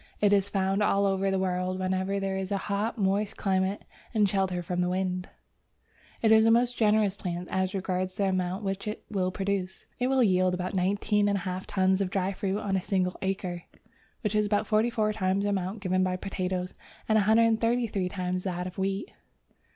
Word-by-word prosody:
It 205 Hz, -1 st, +4 dB
is 200 Hz, 0 st, +3 dB
found 195 Hz, 0 st, 0 dB
all 200 Hz, -1 st, +3 dB
over 195 Hz, 0 st, +1 dB
the 195 Hz, -, +1 dB
world 185 Hz, 0 st, -1 dB
wherever 190 Hz, +1 st, -1 dB
there 195 Hz, 0 st, -2 dB
is 190 Hz, +1 st, -3 dB
a 200 Hz, -, +1 dB
hot, 205 Hz, +4 st, -2 dB
moist 200 Hz, 0 st, 0 dB
climate 190 Hz, 0 st, 0 dB, 0.3 s
and 210 Hz, -2 st, +4 dB
shelter 190 Hz, -2 st, 0 dB
from 180 Hz, +1 st, -2 dB
wind. 180 Hz, 0 st, -1 dB, 0.9 s
It 220 Hz, -, +5 dB
is 220 Hz, 0 st, +7 dB
a 225 Hz, -, +5 dB
most 240 Hz, +2 st, +3 dB
generous 210 Hz, -3 st, +3 dB
plant 180 Hz, -3 st, -5 dB
as 190 Hz, +1 st, 0 dB
regards 185 Hz, -1 st, -2 dB
the 205 Hz, -, -1 dB
amount 185 Hz, +2 st, -1 dB
which 195 Hz, +2 st, -3 dB
it 210 Hz, -, -4 dB
will 185 Hz, -3 st, 0 dB
produce. 190 Hz, 0 st, -3 dB
It 250 Hz, -, +1 dB
will 265 Hz, -1 st, +3 dB
yield 185 Hz, -3 st, +3 dB
about 180 Hz, +2 st, -4 dB
19 205 Hz, +2 st, +1 dB
1/2 185 Hz, -2 st, -2 dB
tons 190 Hz, 0 st, +2 dB
of 190 Hz, -, 0 dB
dry 190 Hz, 0 st, -1 dB
fruit 195 Hz, +1 st, -2 dB
on 200 Hz, -2 st, -1 dB
a 190 Hz, -, +1 dB
single 185 Hz, -1 st, 0 dB
acre, 185 Hz, -2 st, -3 dB, 0.6 s
which 210 Hz, -4 st, -1 dB
is 210 Hz, 0 st, +2 dB
about 205 Hz, +1 st, +1 dB
forty 215 Hz, +2 st, +2 dB
four 215 Hz, -2 st, 0 dB
times 195 Hz, -1 st, 0 dB
the 205 Hz, -, +1 dB
amount 195 Hz, +2 st, -2 dB
given 185 Hz, -1 st, +1 dB
by 185 Hz, 0 st, 0 dB
potatoes 185 Hz, -1 st, -3 dB, 0.3 s
and 220 Hz, -, +3 dB
133 225 Hz, -1 st, +2 dB
times 180 Hz, -1 st, -2 dB
that 180 Hz, -2 st, -3 dB
of 185 Hz, +1 st, -7 dB
wheat. 195 Hz, -, -2 dB
195 Hz, 190 wpm, -28 LUFS, 185-205 Hz, 0.9 s, is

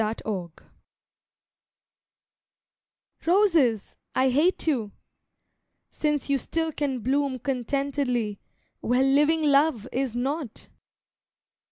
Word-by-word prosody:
TO 220 Hz, +1 st, -1 dB
ROSES 185 Hz, -6 st, -3 dB, 2.8 s
Roses, 335 Hz, -, +2 dB, 0.2 s
I 260 Hz, 0 st, +3 dB
hate 305 Hz, +9 st, +2 dB
you! 235 Hz, -10 st, -1 dB, 1.0 s
since 300 Hz, -2 st, -1 dB
you 280 Hz, -1 st, +1 dB
still 325 Hz, +5 st, -2 dB
can 275 Hz, -4 st, -2 dB
bloom 275 Hz, +2 st, 0 dB
Contentedly, 255 Hz, -4 st, -2 dB, 0.4 s
where 250 Hz, +3 st, +1 dB
living 295 Hz, +4 st, +3 dB
love 285 Hz, -5 st, +3 dB
is 260 Hz, -2 st, -2 dB
not! 270 Hz, 0 st, -4 dB
270 Hz, 85 wpm, -26 LUFS, 240-295 Hz, 2.8 s, I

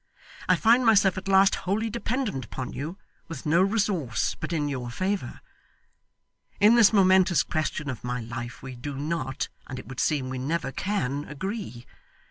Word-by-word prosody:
I -, -, +6 dB
find 235 Hz, +3 st, +4 dB
myself 205 Hz, -5 st, +5 dB
at 195 Hz, -, -12 dB
last 195 Hz, 0 st, +5 dB, 0.2 s
wholly 215 Hz, +3 st, +1 dB
dependent 235 Hz, -, -2 dB
upon 125 Hz, +2 st, -6 dB
you, 155 Hz, +7 st, -5 dB, 0.3 s
with 165 Hz, -5 st, -8 dB
no 165 Hz, +4 st, +4 dB
resource 190 Hz, -, 0 dB
but -, -, -6 dB
in 150 Hz, -3 st, 0 dB
your 130 Hz, -4 st, -4 dB
favour. 185 Hz, -1 st, -3 dB, 1.2 s
In 210 Hz, +3 st, +6 dB
this 235 Hz, -4 st, +6 dB
momentous 190 Hz, -3 st, +4 dB
question 155 Hz, -1 st, -2 dB
of 130 Hz, -4 st, -5 dB
my 125 Hz, 0 st, -2 dB
life 120 Hz, +1 st, -7 dB
we 130 Hz, -1 st, -7 dB
do 140 Hz, +3 st, -6 dB
not, 140 Hz, -2 st, -3 dB, 0.2 s
and 130 Hz, -, -6 dB
it 130 Hz, -, -9 dB
would 130 Hz, -1 st, -7 dB
seem 140 Hz, -4 st, 0 dB
we 130 Hz, -, -4 dB
never 145 Hz, +3 st, -2 dB
can, 145 Hz, -7 st, -2 dB
agree. 185 Hz, -, -6 dB
155 Hz, 165 wpm, -26 LUFS, 130-195 Hz, 1.2 s, I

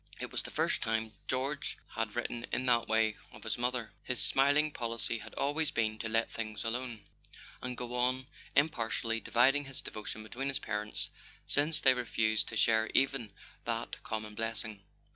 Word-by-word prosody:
It -, -, -5 dB
was -, -, 0 dB
the -, -, -6 dB
first -, -, 0 dB
time 110 Hz, -1 st, -1 dB
George 140 Hz, +3 st, -1 dB, 0.2 s
had 110 Hz, -2 st, -2 dB
written 120 Hz, 0 st, -2 dB
in 130 Hz, -, 0 dB
that 120 Hz, -2 st, +3 dB
way 110 Hz, -1 st, +2 dB
of -, -, -12 dB
his 110 Hz, -, -1 dB
mother. 120 Hz, -2 st, -1 dB
His 125 Hz, -, 0 dB
smiling 145 Hz, +3 st, +4 dB
policy 115 Hz, -2 st, 0 dB
had 110 Hz, +1 st, -11 dB
always 145 Hz, +2 st, +1 dB
been 110 Hz, -1 st, 0 dB
to 115 Hz, -, -3 dB
let 115 Hz, +1 st, +1 dB
things 110 Hz, -2 st, -4 dB
alone, 120 Hz, -1 st, -2 dB, 0.6 s
and 125 Hz, -1 st, -4 dB
go 125 Hz, 0 st, -4 dB
on 125 Hz, +1 st, +1 dB, 0.3 s
impartially 115 Hz, -6 st, +1 dB
dividing 135 Hz, +6 st, +3 dB
his 135 Hz, -1 st, -2 dB
devotion 110 Hz, 0 st, -5 dB
between 125 Hz, +5 st, -4 dB
his 135 Hz, -, +1 dB
parents, 105 Hz, 0 st, -1 dB, 0.3 s
since 150 Hz, +2 st, +4 dB
they 130 Hz, -, +6 dB
refused 110 Hz, -4 st, +1 dB
to 110 Hz, -, -3 dB
share 110 Hz, +1 st, +4 dB
even 135 Hz, -5 st, +2 dB, 0.3 s
that -, -, -3 dB
common 110 Hz, -1 st, -3 dB
blessing. 110 Hz, -1 st, -1 dB
115 Hz, 170 wpm, -32 LUFS, 110-130 Hz, 0.6 s, they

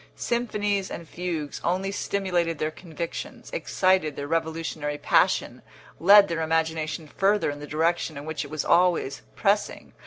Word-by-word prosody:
Symphonies 210 Hz, -5 st, -1 dB
and 170 Hz, -, -7 dB
fugues 170 Hz, -5 st, -4 dB
only 185 Hz, +3 st, 0 dB
stimulated 180 Hz, -5 st, -1 dB
their 155 Hz, +2 st, -1 dB
convictions, 170 Hz, 0 st, -7 dB
excited 185 Hz, -, +1 dB
their 140 Hz, -, -4 dB
revolutionary 160 Hz, -2 st, -2 dB
passion, -, -, +2 dB, 0.4 s
led 200 Hz, +3 st, +8 dB
their 165 Hz, -1 st, -2 dB
imagination 160 Hz, -1 st, -1 dB
further 195 Hz, +1 st, +1 dB
in 145 Hz, -, -8 dB
the 150 Hz, -, -8 dB
direction 160 Hz, 0 st, 0 dB
in 140 Hz, -, -7 dB
which 160 Hz, 0 st, -3 dB
it 140 Hz, -, -9 dB
was 155 Hz, 0 st, -3 dB
always 170 Hz, -6 st, +2 dB
pressing. 205 Hz, 0 st, 0 dB
165 Hz, 145 wpm, -26 LUFS, 155-190 Hz, 0.4 s, led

